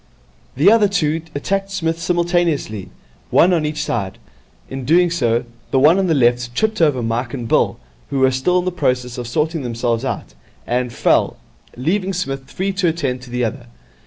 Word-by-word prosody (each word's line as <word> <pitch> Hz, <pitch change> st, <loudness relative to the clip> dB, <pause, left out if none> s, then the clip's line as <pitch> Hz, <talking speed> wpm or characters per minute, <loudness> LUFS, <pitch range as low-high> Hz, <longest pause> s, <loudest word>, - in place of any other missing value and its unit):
The 160 Hz, +10 st, +5 dB
other 220 Hz, -2 st, +5 dB
two 165 Hz, -5 st, 0 dB
attacked 195 Hz, +7 st, -1 dB
Psmith 165 Hz, -4 st, -2 dB
simultaneously, 170 Hz, -, 0 dB, 0.4 s
one 180 Hz, +2 st, +5 dB
on 155 Hz, -3 st, +1 dB
each 150 Hz, 0 st, -2 dB
side. 100 Hz, -9 st, -3 dB, 0.5 s
In 135 Hz, 0 st, -6 dB
doing 170 Hz, +6 st, +4 dB
so, 120 Hz, -8 st, +1 dB, 0.2 s
the -, -, +1 dB
one 155 Hz, +8 st, +5 dB
on 190 Hz, -, +1 dB
the 165 Hz, -, +2 dB
left 120 Hz, -2 st, +2 dB
tripped 220 Hz, -3 st, 0 dB
over 145 Hz, -6 st, +3 dB
Mike 120 Hz, +3 st, -2 dB
and 120 Hz, -3 st, -5 dB
Bill, -, -, +2 dB, 0.3 s
who 140 Hz, -, -2 dB
were 130 Hz, 0 st, +4 dB
still 130 Hz, +8 st, +1 dB
in 180 Hz, -, 0 dB
the 185 Hz, -, 0 dB
process 125 Hz, -7 st, -1 dB
of 120 Hz, -, -5 dB
sorting 155 Hz, +6 st, -1 dB
themselves 120 Hz, -1 st, -1 dB
out, 130 Hz, -, -4 dB, 0.3 s
and 125 Hz, 0 st, -1 dB
fell, -, -, +2 dB, 0.4 s
leaving 185 Hz, +9 st, 0 dB
Psmith 135 Hz, -7 st, -4 dB
free 195 Hz, +1 st, -2 dB
to 190 Hz, -2 st, +1 dB
attend 140 Hz, -7 st, -1 dB
to 125 Hz, -, -12 dB
the 125 Hz, 0 st, -1 dB
other. 120 Hz, +2 st, -5 dB
145 Hz, 185 wpm, -19 LUFS, 125-175 Hz, 0.5 s, The